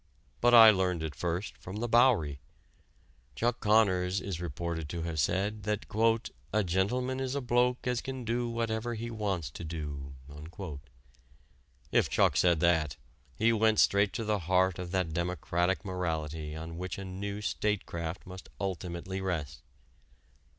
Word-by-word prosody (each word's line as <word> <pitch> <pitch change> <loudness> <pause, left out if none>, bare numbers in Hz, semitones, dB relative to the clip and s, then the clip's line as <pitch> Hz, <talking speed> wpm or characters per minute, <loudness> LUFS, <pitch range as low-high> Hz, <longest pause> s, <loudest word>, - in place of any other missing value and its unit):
But 120 0 +5
I 110 -2 +11
learned 90 -4 0
it 80 -2 -3
first 90 +3 -3
from 95 - -8
the 115 +3 -2
Bowery. 115 - +4 1.0
Chuck 120 - 0
Connors 100 -4 +3
is 95 -3 -5
reported 85 -1 -4
to 85 0 -4
have 80 -2 -3
said 100 +8 0
that 105 -1 -1 0.7
"a 105 +1 +2
gentleman 125 +9 0
is 130 0 -2
a - - +1
bloke 125 0 +1
as 125 -1 0
can 130 -2 -6
do 120 +1 -1
whatever 115 0 -2
he 115 +1 -5
wants 100 -7 -2
to - - -8
do." 75 -4 -6 1.8
If - - +3
Chuck - - +3
said 85 -3 +3
that, 80 -5 +2 0.4
he 115 +7 +3
went 110 -1 +3
straight 100 0 +4
to 115 - -2
the 105 -1 0
heart 90 +1 +2
of 90 -1 -5
that 90 -3 -1
democratic 90 +2 -1
morality 80 -4 -3
on 80 +1 -7
which 90 -1 -4
a 100 - -6
new 100 +2 -5
statecraft 95 -5 -2
must 95 0 -10
ultimately 95 0 -4
rest. 80 -6 -3
95 Hz, 150 wpm, -30 LUFS, 85-110 Hz, 1.8 s, I